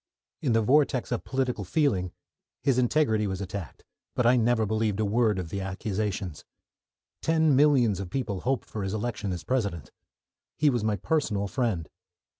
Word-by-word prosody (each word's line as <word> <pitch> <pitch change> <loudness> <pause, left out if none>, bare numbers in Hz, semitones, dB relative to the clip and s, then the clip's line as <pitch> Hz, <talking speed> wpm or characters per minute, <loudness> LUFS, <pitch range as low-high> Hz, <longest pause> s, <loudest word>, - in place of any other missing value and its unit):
In 130 -6 +1
the 115 0 +3
vortex 135 0 +2
of 120 - -1
political 130 -5 -1
feeling 95 - +1 0.5
his 135 -3 +3
integrity 120 -5 +2
was 95 -1 -3
attacked 95 -2 -6 0.3
but 125 - +1
I 120 +2 +6
never 115 -1 +2
believed 110 -1 0
a 110 - +2
word 110 0 +2
of 90 -3 -4
the 100 +4 -3
accusations. 95 -2 -3 0.8
Ten 160 -3 +3
millions 130 -8 +4
of 95 -3 -5
people 105 -5 -3
hoped 130 -1 -1
for 110 - -5
his 95 +2 -2
election 105 -3 -3
as 90 - -4
President. 100 - -2 0.7
He 150 -2 +4
was 120 -4 -1
my 110 -1 +1
personal 105 - 0
friend. 95 -7 -1
110 Hz, 165 wpm, -27 LUFS, 100-130 Hz, 0.8 s, I